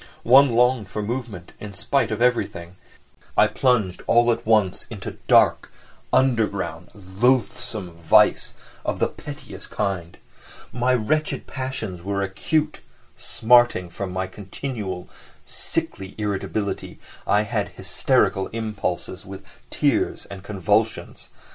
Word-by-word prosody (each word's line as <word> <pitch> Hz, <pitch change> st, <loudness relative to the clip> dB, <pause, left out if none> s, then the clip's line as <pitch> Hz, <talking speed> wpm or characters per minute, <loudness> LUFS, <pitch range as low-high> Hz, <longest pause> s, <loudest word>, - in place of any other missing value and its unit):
One 130 Hz, 0 st, +6 dB
longed 125 Hz, -4 st, +3 dB
for 105 Hz, +2 st, -4 dB
movement 110 Hz, -6 st, -5 dB
in 105 Hz, -1 st, -8 dB
spite 140 Hz, +7 st, 0 dB
of 110 Hz, +2 st, -1 dB
everything, 115 Hz, -8 st, 0 dB
and 90 Hz, -, -20 dB, 0.6 s
I -, -, +7 dB
plunged 115 Hz, -9 st, +1 dB
all 120 Hz, 0 st, +5 dB
at 115 Hz, -1 st, -3 dB
once 105 Hz, -5 st, +2 dB
into -, -, -7 dB
dark, -, -, +4 dB, 0.4 s
underground, 115 Hz, -7 st, +1 dB
loathsome 105 Hz, 0 st, 0 dB
vice 80 Hz, -, +4 dB, 0.3 s
of -, -, -2 dB
the -, -, +2 dB
pettiest -, -, -9 dB
kind. 85 Hz, -4 st, -3 dB, 0.6 s
My 125 Hz, +1 st, +2 dB
wretched 150 Hz, +7 st, -1 dB
passions 130 Hz, -9 st, -5 dB
were 100 Hz, +2 st, -2 dB
acute, 150 Hz, +11 st, -1 dB, 0.3 s
smarting, 120 Hz, -6 st, +3 dB
from 95 Hz, +1 st, -5 dB
my 95 Hz, +1 st, -2 dB
continual, 100 Hz, 0 st, -6 dB, 0.4 s
sickly 95 Hz, 0 st, -4 dB
irritability 105 Hz, 0 st, -3 dB, 0.3 s
I 105 Hz, +1 st, +3 dB
had 105 Hz, -2 st, -2 dB
hysterical 95 Hz, -, +1 dB
impulses, 105 Hz, -4 st, -4 dB
with 95 Hz, 0 st, -10 dB, 0.2 s
tears -, -, 0 dB
and 100 Hz, -1 st, -8 dB
convulsions. 105 Hz, +2 st, -1 dB
105 Hz, 115 wpm, -23 LUFS, 95-120 Hz, 0.6 s, I